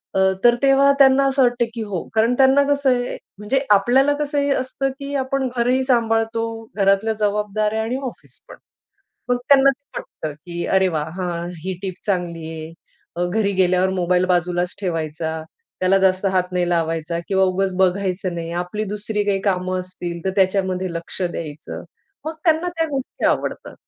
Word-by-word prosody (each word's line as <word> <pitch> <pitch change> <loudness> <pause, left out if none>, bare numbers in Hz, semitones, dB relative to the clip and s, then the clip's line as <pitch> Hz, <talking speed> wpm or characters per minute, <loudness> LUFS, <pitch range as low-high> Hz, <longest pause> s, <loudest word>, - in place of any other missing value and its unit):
अ, - - +2 0.2
तर 240 0 +6
तेव्हा 275 0 +5
त्यांना 270 0 +6
असं 270 0 +1
वाटतं, 245 -1 +2
की 230 - -5
हो. 195 -5 -4
कारण 225 +2 +3
त्यांना 270 +1 +5
कसं 285 -1 +2
आहे. 245 -1 0 0.2
म्हणजे 210 +6 0
आपल्याला 255 +8 +4
कसं 295 0 0
ही 285 0 +1
असतं, 270 0 -1
की 280 0 -6
आपण 265 0 0
घरही 250 +2 +2
सांभाळतो, 225 -2 +1 0.3
घरातल्या 195 +2 +2
जबाबदाऱ्या 210 +1 0
आणि 240 +4 -2
ऑफिस 245 - -8
पण. - - -10 0.7
मग 245 - +3
त्यांना 275 -1 +7
ते 275 +1 -8
पटतं, 155 - -7
की 170 +3 -6
अरे, 190 0 +3
वाह! 155 -3 -2
हा, 180 -1 -1 0.3
ही 190 0 -2
टीप 190 -2 -3
चांगली 175 -5 -2
आहे 160 0 -7 0.4
अ, 175 - 0
घरी 200 +2 0
गेल्यावर 185 0 +2
मोबाईल 180 +1 +2
बाजूलाच 175 0 0
ठेवायचा, 160 -3 -2 0.5
त्याला 185 +1 +4
जास्त 185 +1 +2
हात 180 -1 0
नाही 180 -1 0
लावायचा 165 0 -1
किंवा 190 -1 +3
उगीच 190 +1 0
बघायचं 185 -1 0
नाही. 165 -1 -5
आपली 210 +4 -4
दुसरी 210 0 -2
काही 195 -1 +1
कामं 185 0 -1
असतील 175 -2 -6
तर 190 - +1
त्याच्यामध्ये 185 -1 +1
लक्ष 170 +3 -6
द्यायचं. 155 -4 -5 0.4
मग 315 - -3
त्यांना 325 +1 +3
त्या 325 - +2
गोष्टी 270 -2 -4
आवडतात. - - -1
195 Hz, 170 wpm, -21 LUFS, 180-250 Hz, 0.7 s, त्यांना